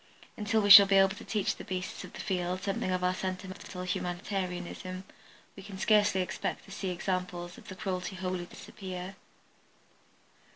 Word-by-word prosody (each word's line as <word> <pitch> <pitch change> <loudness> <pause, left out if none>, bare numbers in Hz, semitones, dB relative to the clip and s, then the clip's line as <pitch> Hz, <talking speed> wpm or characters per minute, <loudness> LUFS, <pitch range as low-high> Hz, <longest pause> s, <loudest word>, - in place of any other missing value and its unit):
Until 215 +1 +1
we 205 0 +3
shall 200 0 +13
be 195 0 +4
able 195 0 +5
to - - -10
teach 210 -3 -1
the - - -9
beasts 185 -1 -4
of - - -11
the - - -6
field 180 0 -2
something 195 -2 -1
of 185 0 0
our 180 0 +2
sentimental 185 0 -5
humanitarianism 185 0 -3 0.5
we 195 - -10
can 195 0 -9
scarcely 205 -2 +3
expect 180 - -4
to - - -14
see 195 -1 -3
examples 180 -1 -3
of - - -14
cruelty 185 0 -3
wholly 185 -1 -3
disappear. 185 0 -8
185 Hz, 160 wpm, -30 LUFS, 180-195 Hz, 0.5 s, shall